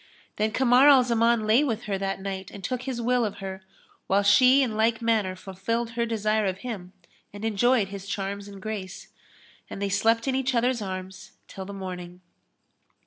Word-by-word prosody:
Then 215 +1 +1
Kamar 255 +3 +4
al 270 -3 +7
Zaman 235 -1 +2
lay 225 +7 +4
with 230 -5 -2
her 205 -2 -2
that 195 0 -2
night 190 -1 -5
and 200 - -11
took 250 +6 -2
his 255 -2 -4
will 245 +1 +1
of 205 -2 -2
her, 190 -1 -6 0.5
whilst 200 +1 +4
she 260 +2 +6
in 230 -4 -2
like 225 +1 +2
manner 220 -5 0
fulfilled 210 +5 -3
her 235 0 -1
desire 215 -1 0
of 190 -1 -2
him 195 -7 -6 0.4
and 205 +2 -7
enjoyed 225 0 +2
his 200 -1 -8
charms 200 0 -4
and 200 -1 -10
grace; 195 -2 -6 0.6
and - - -7
they 200 0 -1
slept 225 +5 +2
in 265 - +1
each 265 0 0
other's 240 0 +1
arms 185 -1 -7
till 190 - -8
the 200 - -8
morning. 180 -2 -7
215 Hz, 190 wpm, -26 LUFS, 195-235 Hz, 0.6 s, al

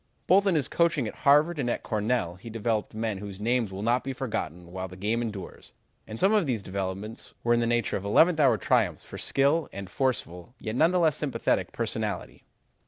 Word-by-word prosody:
Both 200 +2 +4
in 185 - +3
his 145 -4 +1
coaching 165 -8 +1
at - - -5
Harvard 150 +3 +3
and 125 -3 0
at - - -2
Cornell 110 -4 0
he 95 +6 -11
developed 110 -1 -2
men 110 -3 -2
whose 100 -1 -8
names 115 -1 0
will 95 +2 -5
not 120 +3 +2
be 135 - -3
forgotten 90 - -4
while 95 +1 -4
the 90 - -11
game 110 +5 0
endures, 105 -5 -7 0.3
and 110 +1 -7
some 195 +3 +4
of 205 -7 +3
these 115 -6 -1
developments 95 +3 -5
were 120 - +3
in 120 - +3
the 115 - +1
nature 120 -2 +1
of 95 - -7
eleventh 160 - +4
hour 130 -6 +5
triumphs - - +1
for - - -9
skill 140 +4 +1
and 100 -1 -8
forceful, 125 -5 -2
yet 110 - -5
none 160 +6 +5
the 180 - +1
less 160 -4 +3
sympathetic, 150 -3 0
personality. - - -3
115 Hz, 210 wpm, -27 LUFS, 100-140 Hz, 0.3 s, hour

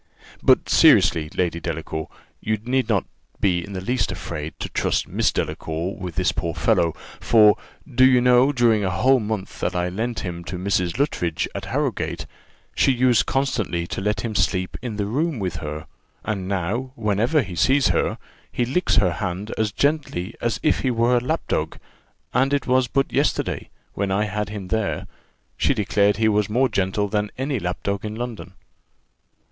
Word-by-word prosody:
"But, - - +4
seriously, 75 -2 +5
Lady 85 -2 0
Delacour, 80 -1 -4 0.3
you 110 0 -1
need 125 +3 -1
not 105 -5 +2 0.3
be 90 -3 +1
in 100 - -9
the 95 - -3
least 120 -2 0
afraid 80 -5 -6
to - - -4
trust - - 0
Miss - - +1
Delacour 80 +4 -3
with 90 -5 -7
this - - +2
poor 85 -1 -3
fellow; 85 -2 +2 0.2
for, 105 -2 +6 0.3
do 130 -2 +2
you 130 -1 +6
know, 125 +2 +5
during 115 -5 +3
a 95 - +1
whole 130 +7 +3
month 105 -3 -4
that - - -1
I 90 0 0
lent 115 +6 -3
him 85 -3 -5
to 90 - -5
Mrs. 90 -2 0
Luttridge, 90 - 0
at - - -5
Harrowgate, - - -2 0.5
she - - +3
used 125 -2 +3
constantly 110 -11 -1
to 90 - -5
let 105 +2 0
him 115 -2 -3
sleep 95 -2 0
in 120 -4 -4
the 105 -1 -1
room 145 +8 -1
with 95 -5 -3
her; 75 0 -6 0.4
and 100 -4 -2
now, 100 +8 -2
whenever 115 +7 +1
he 95 -4 -8
sees 135 +9 +3
her, - - 0 0.3
he 120 - 0
licks 170 +9 +1
her 90 -3 +3
hand 95 +4 -4
as 110 -2 0
gently 140 - -1
as 120 -2 -1
if 155 - +3
he 130 - 0
were 120 +1 +3
a 120 - -1
lapdog; 125 - -1 0.6
and 130 +3 +2
it 140 - -2
was 130 0 +2
but 135 +3 0
yesterday, - - 0 0.2
when 100 0 -1
I 100 +2 +1
had 105 -1 -3
him 100 -3 -7
there, 110 -2 -1 0.5
she 140 - +2
declared 105 -1 +2
he 110 0 +2
was 105 -1 +2
more 125 +4 +2
gentle 100 0 0
than 105 0 -1
any 130 -1 -1
lapdog 100 +2 -3
in 110 0 -4
London." 110 -7 -6
105 Hz, 180 wpm, -23 LUFS, 95-125 Hz, 0.6 s, for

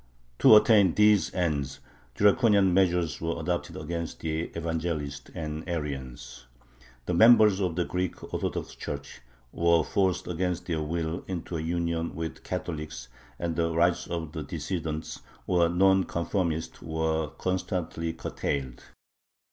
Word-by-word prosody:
To - - +8
attain 105 -5 +5
these 105 -2 +4
ends 75 -7 -1 0.4
draconian 100 - +4
measures 90 -3 +2
were 85 0 -2
adopted 85 +2 -3
against 85 +1 -5
the 80 +1 -2
Evangelists 80 -4 -3
and 75 -1 -4
Arians. 65 -6 -5 0.6
The - - -1
members 110 0 +6
of 90 -4 -1
the 90 0 0
Greek 90 -1 -4
Orthodox - - -3
Church 70 -2 -7 0.3
were 85 -1 +3
forced 95 +2 0
against 90 0 -2
their 80 -3 -1
will 80 +2 -3
into 90 -2 -4
a 80 - -2
union 85 0 -2
with 80 0 -3
the - - -20
Catholics, 75 -6 -5 0.3
and 85 -1 -2
the 85 0 0
rights 85 +1 +2
of 85 -3 -4
the 80 -1 -5
"dissidents," 80 +1 -4 0.2
or 85 -2 +3
non 95 +1 +4
conformists, 85 -2 -2
were 80 -1 -1
constantly 90 -3 -2
curtailed. 70 -5 -4
85 Hz, 130 wpm, -28 LUFS, 80-90 Hz, 0.6 s, To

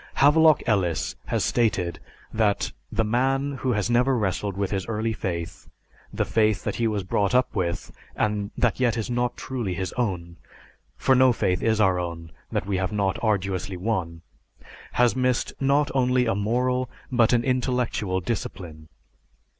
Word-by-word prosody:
Havelock 155 +2 +5
Ellis 95 -8 0
has - - 0
stated 100 -7 0 0.3
that, 110 -2 +1 0.2
"The 115 - +1
man 135 +5 +1
who 130 -1 0
has 105 -2 0
never 125 +2 +3
wrestled 100 -1 -2
with 100 -1 -1
his 95 -2 -2
early 110 0 -1
faith, 85 -4 -5 0.4
the - - -1
faith 110 -2 +1
that - - -3
he 115 - +1
was 105 -3 -1
brought 100 +4 0
up 125 0 +2
with 85 -4 -2 0.2
and 105 -1 -1
that 120 0 +1
yet 120 -2 +2
is 115 +2 -3
not 120 0 -1
truly 120 -9 -3
his 95 0 -3
own 90 -8 -3 0.6
for 135 - +3
no 130 0 +6
faith 90 -6 0
is 110 -1 +1
our 95 -4 +3
own 85 -2 -5 0.2
that - - -1
we 100 -1 -1
have 95 -1 -1
not 100 -1 -1
arduously 95 -3 -1
won 90 -5 -3 0.7
has 120 0 +3
missed 125 -1 0
not 140 +2 +2
only 125 -1 +2
a 115 - +1
moral 125 +5 0 0.2
but 120 -3 +4
an 120 -1 +3
intellectual 125 -7 0
discipline. 85 -6 -5
110 Hz, 160 wpm, -25 LUFS, 95-125 Hz, 0.7 s, no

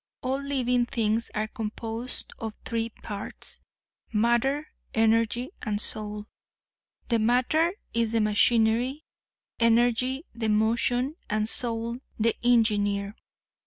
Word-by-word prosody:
All 265 +2 -1
living 250 -3 +1
things 230 -2 0
are 215 +1 0
composed 225 +1 -5
of 220 -1 -5
three 230 -1 -1
parts, 205 -2 -7 0.5
matter, 240 +7 +2 0.3
energy 230 +3 +2
and 210 -3 -1
soul. 210 -1 -4 0.8
The 230 -2 +3
matter 255 +9 +3 0.2
is 230 -1 +1
the 230 - +3
machinery; 230 +6 +3 0.6
energy 240 +5 +3
the 225 -1 -2
motion 235 +6 +2
and 215 0 0
soul 235 0 +1 0.2
the 230 +1 +2
engineer. 205 -4 +2
230 Hz, 105 wpm, -27 LUFS, 220-245 Hz, 0.8 s, The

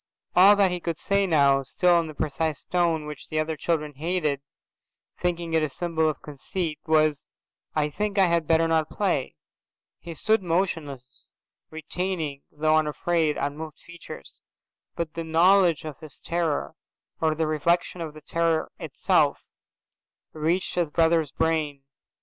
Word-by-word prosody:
All 195 +3 +8
that 200 -2 +3
he 180 - -2
could 170 -2 -3
say 200 +1 +1
now, 140 -5 +4
still 175 +6 +3
in 165 - -2
the 155 - -9
precise 155 0 -2
tone 170 -3 0
which 150 -2 -9
other 155 0 -1
children 150 -1 -1
hated, 155 -1 -1 0.8
thinking 170 -2 -1
it 160 - +3
a 155 - 0
symbol 160 0 0
of 150 - -6
conceit, 150 +2 -4
was, 155 -3 +2 0.5
"I 150 -1 +1
think 210 +5 -2
I 195 - +6
had 170 -3 +1
better 165 0 +3
not 160 -1 +1
play." 180 - -1 0.6
He 170 -1 -8
stood 220 +7 +2
motionless, 160 -8 -3 0.4
retaining, 160 -2 -3
though 155 +1 +3
afraid, 155 0 0
unmoved 150 +1 -4
features. 170 - -12 0.5
But 170 -1 -3
the 165 - -4
knowledge 170 0 +4
of 150 -4 -7
his 155 -3 -11
terror, 165 -3 -2 0.5
or 160 -1 +2
the 160 +1 0
reflection 170 +3 0
of 155 -2 -6
the 155 - -11
terror 165 0 0
itself, - - +1 0.9
reached 165 +4 -1
his 175 -3 0
brother's 160 -1 +2
brain. 150 -2 -1
160 Hz, 145 wpm, -25 LUFS, 150-170 Hz, 0.9 s, All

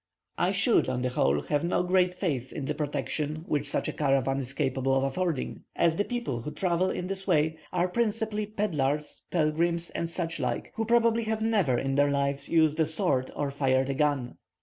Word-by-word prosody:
I - - +3
should, - - +2
on 125 -1 -1
the 125 - +1
whole, 75 - +1
have 145 - 0
no 175 +1 +1
great 180 0 +2
faith 135 - -2
in 145 - -5
the 150 - -1
protection 150 +1 -3
which 145 -1 0
such - - -1
a - - -2
caravan 135 -2 +1
is 130 -1 -4
capable 135 -2 0
of 135 - +2
affording, 150 +1 -2
as 165 -1 +3
the 205 - +1
people 235 - -3
who 135 - -5
travel 180 +3 +1
in 180 - -3
this 190 +1 -4
way 160 -2 +2
are 180 0 +1
principally 215 0 -1
pedlars, 150 -9 -2
pilgrims, 170 +1 0
and 170 - -3
such 165 -1 -3
like, 125 -2 -2
who 225 - -2
probably 230 0 +3
have 220 0 -1
never 200 - +2
in 135 +2 -1
their 145 +1 +3
lives 140 0 0
used 160 -1 +3
a 160 - +3
sword 160 -6 +1
or 145 -1 -2
fired 135 -1 +1
a - - +1
gun. 140 -3 0
155 Hz, 200 wpm, -28 LUFS, 135-180 Hz, -, I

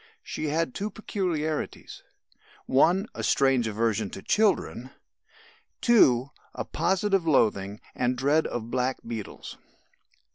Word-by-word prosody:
She - - -5
had 155 -2 0
two 205 +2 -3
peculiarities: 175 -8 -3 0.6
(1) 175 +9 +3
A - - -6
strange 135 -4 +2
aversion 110 -1 0
to 95 - -9
children; 195 - +1 0.9
(2) 140 - +4 0.2
a - - -4
positive 195 -2 0
loathing 105 -8 +2
and 125 0 0
dread 145 +5 +2
of 115 0 -5
blackbeetles. 125 -4 -4
135 Hz, 105 wpm, -27 LUFS, 115-175 Hz, 0.9 s, 2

